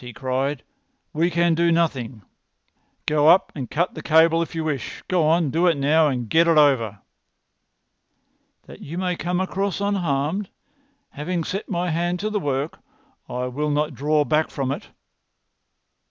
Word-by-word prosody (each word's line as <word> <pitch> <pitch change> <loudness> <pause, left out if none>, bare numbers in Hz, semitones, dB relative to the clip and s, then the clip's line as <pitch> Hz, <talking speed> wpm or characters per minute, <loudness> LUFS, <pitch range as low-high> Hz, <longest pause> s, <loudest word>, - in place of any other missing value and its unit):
he 125 - -8
cried. 130 +2 -2 0.5
"We 165 +3 +1
can 170 0 +2
do 170 +1 +2
nothing. 130 -10 -1 0.8
Go 150 0 +2
up 180 +4 +5
and 130 -5 -6
cut 170 +4 -1
the - - -7
cable 165 +1 +4
if 165 - -5
you 160 - -2
wish. 145 -5 -4
Go 175 -4 +2
on—do 165 +1 +2
it 165 -4 +3
now, 150 +3 +3
and 125 -4 -2
get 165 +7 +3
it 165 -2 +4
over!" 115 -9 +3 1.6
"That - - -13
you 165 +4 -7
may 180 -1 -1
come 175 +1 -2
across 195 +1 -2
unharmed. 185 -2 -1 0.6
Having 170 +4 -3
set 195 +6 -5
my 175 -2 -1
hand 175 +2 -1
to 215 +1 -2
the 210 - 0
work, 140 -2 -3 0.5
I 125 +1 -3
will 145 +4 -2
not 150 +1 0
draw 150 +3 +1
back 155 +1 +1
from 135 -2 -3
it." - - -5
160 Hz, 160 wpm, -23 LUFS, 140-175 Hz, 1.6 s, up